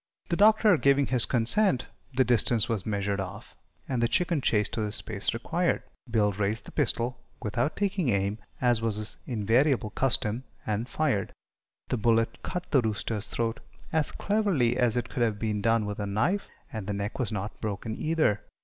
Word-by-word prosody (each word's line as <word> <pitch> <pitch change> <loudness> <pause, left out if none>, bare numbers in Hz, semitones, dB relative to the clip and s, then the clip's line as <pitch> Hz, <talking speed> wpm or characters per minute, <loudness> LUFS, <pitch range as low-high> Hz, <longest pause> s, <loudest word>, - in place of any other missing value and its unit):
The 170 - +1
Doctor, 215 -1 +6
giving 140 -1 +4
his 125 -3 +1
consent, 130 - +2 0.3
the 130 0 +3
distance 120 -2 +2
was 110 -4 -2
measured 100 -1 -1
off, 95 +2 -7 0.3
and 130 -3 -1
the 120 - +4
chicken 170 +1 +1
chased 105 -4 +2
to 110 - -1
the 105 -1 -1
space 105 -1 -2
required. 170 +9 0 0.3
Bill 105 -3 +3
raised 105 +3 -2
the - - -10
pistol 125 -3 -1 0.2
without 120 +6 0
taking 195 -7 0
aim, 100 0 0 0.2
as 120 -3 +3
was 115 -2 0
his 110 +1 -4
invariable 120 +1 +2
custom 120 -1 +1 0.2
and 110 +3 -2
fired. 135 -11 0 0.6
The 125 - 0
bullet 115 0 +2
cut 180 -1 -5
the 135 - +5
rooster's 110 -1 -2
throat 115 -1 -1 0.3
as 160 -2 +2
cleverly 195 - +1
as 125 -2 +2
it 120 - -1
could 125 - -4
have 110 -3 +2
been 105 -1 -1
done 115 0 +2
with 105 0 -4
a 100 - -2
knife, 110 - 0 0.3
and 110 -4 -5
the 105 - -1
neck 100 +4 -3
was 120 -4 0
not 105 0 -4
broken 110 +1 -3
either. 155 -10 +1
115 Hz, 180 wpm, -28 LUFS, 105-135 Hz, 0.6 s, Doctor